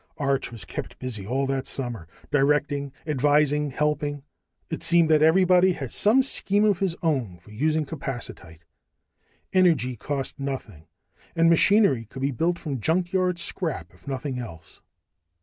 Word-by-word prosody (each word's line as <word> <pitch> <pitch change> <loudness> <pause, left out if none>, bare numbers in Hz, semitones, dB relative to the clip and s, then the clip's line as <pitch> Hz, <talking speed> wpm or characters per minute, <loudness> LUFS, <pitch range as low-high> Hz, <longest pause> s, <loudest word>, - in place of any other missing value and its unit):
Arch 140 -4 -1
was 115 -3 -5
kept - - -7
busy 110 -7 -5
all 135 +4 0
that 135 -1 -2
summer, 120 - -4 0.2
directing, 145 0 +1
advising, 150 0 +2
helping. 145 0 -1 0.5
It 160 - -3
seemed 170 -1 +4
that 155 -1 +4
everybody 180 +3 +5
had 135 -7 -6
some 235 +6 +4
scheme 205 -5 +1
of 205 -4 +2
his 190 -4 0
own 130 - 0
for 85 +5 -18
using 155 +7 0
capacitite. 120 - -7 0.9
Energy 160 - +3
cost 135 +3 -4
nothing, 120 - -6 0.5
and 165 0 +4
machinery 170 - +4
could 130 +5 -8
be 140 - +1
built 170 +7 0
from 140 -8 -5
junkyard 180 - +1
scrap 170 -2 -4
if - - -23
nothing 135 -1 -3
else. 80 -9 -10
145 Hz, 145 wpm, -25 LUFS, 130-165 Hz, 0.9 s, everybody